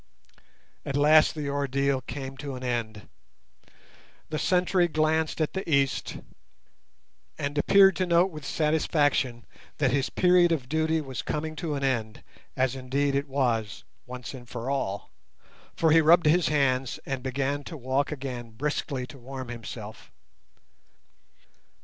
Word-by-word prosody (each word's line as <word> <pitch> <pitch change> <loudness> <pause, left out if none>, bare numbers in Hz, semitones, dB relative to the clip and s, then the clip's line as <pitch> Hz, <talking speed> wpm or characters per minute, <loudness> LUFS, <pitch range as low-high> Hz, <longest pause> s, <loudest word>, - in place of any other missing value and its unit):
At 140 - -2
last 155 +2 +5
the 150 -2 -4
ordeal 140 -1 0
came 135 -1 -6
to 140 -1 -6
an 125 - -8
end. 115 -4 -3 1.2
The 155 - -2
sentry 180 -1 +2
glanced 155 0 0
at 155 - 0
the 190 -3 -4
east, 140 -2 +1 1.2
and 145 0 -3
appeared 195 +6 +5
to 185 - 0
note 175 +2 +3
with 155 -2 -9
satisfaction 145 -5 +1 0.3
that 135 -4 +2
his 135 0 0
period 180 -1 +4
of 140 -7 -1
duty 160 +2 +1
was 135 -4 -5
coming 155 +1 -3
to 155 -2 -3
an 140 - -3
end—as 130 +1 -3
indeed 135 +2 -1
it 140 +1 0
was, 120 -6 -1 0.2
once 125 0 -7
and 120 -3 -11
for 120 +2 -4
all—for 135 +6 -4
he 165 +1 +6
rubbed 165 +2 +5
his 170 +3 +4
hands 135 -4 +1
and 135 -2 -3
began 135 +2 -2
to 160 - -7
walk 130 +3 -1
again 130 -5 -5
briskly 135 +2 -3
to 135 +2 -13
warm 130 0 -7
himself. 115 -2 -8
140 Hz, 135 wpm, -27 LUFS, 130-155 Hz, 1.2 s, he